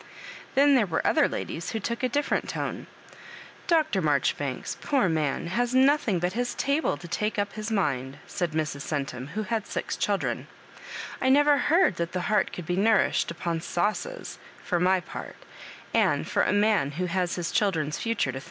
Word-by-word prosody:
Then 280 +1 +6
there 240 -6 +4
were 160 -2 -1
other - - +4
ladies 165 - -4
who 225 - -1
took 235 +3 -3
a 255 - +1
different 290 +4 0
tone. - - -4 0.4
" - - -16
Dr. 305 -12 +1
Marjoribanks, 145 -3 0
poor 270 -9 +2
man, 155 -4 0
has 240 +8 0
nothing 265 -6 +4
but 180 +1 -1
his 245 +2 -2
table 280 - 0
to 160 - -10
take 210 +6 -2
up 205 0 -1
his 215 +1 -5
mmd," 140 - -1
said 175 -3 -3
Mrs. 155 -2 -2
Oentum, 135 -3 -3
who 215 - -1
had 225 -1 -2
six - - -3
children; - - -1 0.4
" - - -9
I 260 - +3
never 290 +1 +5
heard 335 - +3
that 170 0 -2
the 180 - -1
heart 210 +4 +1
could 180 - -7
be 175 +1 -1
nourished 215 +1 +3
upon 170 0 -3
sauces, 215 - -2 0.2
for 175 - 0
my 185 +1 +3
part; - - -8 0.6
and - - +2
for - - +1
a - - +2
man 205 -9 +2
who 180 +5 -2
has 180 0 -1
his 175 -2 -3
children's 165 -9 0
fu 230 0 -1
ture 135 - 0
to. 135 - -4
190 Hz, 190 wpm, -27 LUFS, 165-235 Hz, 0.6 s, Then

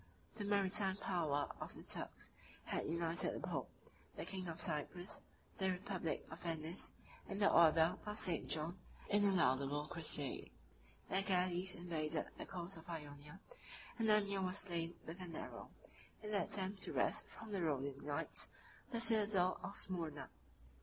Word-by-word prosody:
The 205 - -5
maritime 195 -1 +4
power 155 -8 0
of - - -5
the - - -9
Turks - - -3 0.3
had - - -2
united 170 +1 +1
the - - -4
pope, - - -2 0.5
the - - -4
king 185 0 -2
of 165 0 -5
Cyprus, 175 +3 -1 0.4
the 190 -1 +2
republic 180 -2 -2
of 160 - -7
Venice, 165 0 -2 0.4
and 200 - -3
the 200 - +5
order 165 0 +6
of 210 0 -3
St. 175 -6 +1
John, 160 +3 0 0.3
in 205 0 +5
a 200 - +6
laudable 145 -4 +2
crusade; 150 -3 +1 0.6
their 190 - +1
galleys 185 -1 +2
invaded 160 -3 -2
the - - -7
coast 180 -1 -4
of 165 +2 -12
Ionia; 150 +1 -7 0.6
and 225 -1 +2
Amir 200 -2 +3
was 185 +1 +1
slain 170 -3 +2
with 170 +4 -7
an 175 -2 -6
arrow, - - -6 0.5
in 210 - -4
the 205 - +2
attempt 195 0 +1
to - - 0
wrest - - +3
from 220 -1 -10
the 195 -3 -1
Rhodian 140 -3 -1
knights 145 0 0 0.4
the 235 -3 -1
citadel 210 -5 +4
of 200 - -5
Smyrna. 165 -6 -3
175 Hz, 160 wpm, -39 LUFS, 160-195 Hz, 0.6 s, order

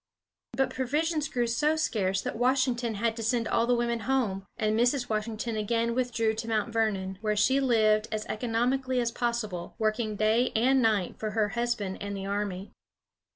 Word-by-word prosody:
But 265 +2 +1
provisions 300 +4 -1
grew 245 -1 0
so 295 +7 +1
scarce 195 -11 0
that - - -3
Washington 245 -1 +1
had 225 +2 0
to - - -4
send 230 +1 0
all 230 0 +1
the 245 - +3
women 235 0 0
home, 215 -5 -1
and 215 -1 +1
Mrs. 245 +2 +1
Washington 220 +1 -2
again 230 +2 0
withdrew 235 -3 0
to 225 +1 -5
Mount 225 0 -1
Vernon, 195 -4 -1
where 215 -1 0
she 260 +7 +3
lived 220 -4 +3
as 215 0 -2
economically 250 +3 0
as 235 -1 0
possible, 225 -8 -3
working 215 -1 0
day 220 +4 +2
and 260 +4 +4
night 215 -6 +1
for 215 - -2
her 210 -1 +2
husband 235 -3 -2
and 200 0 -4
the 195 - -5
army. 200 -1 -3
230 Hz, 175 wpm, -28 LUFS, 215-245 Hz, -, and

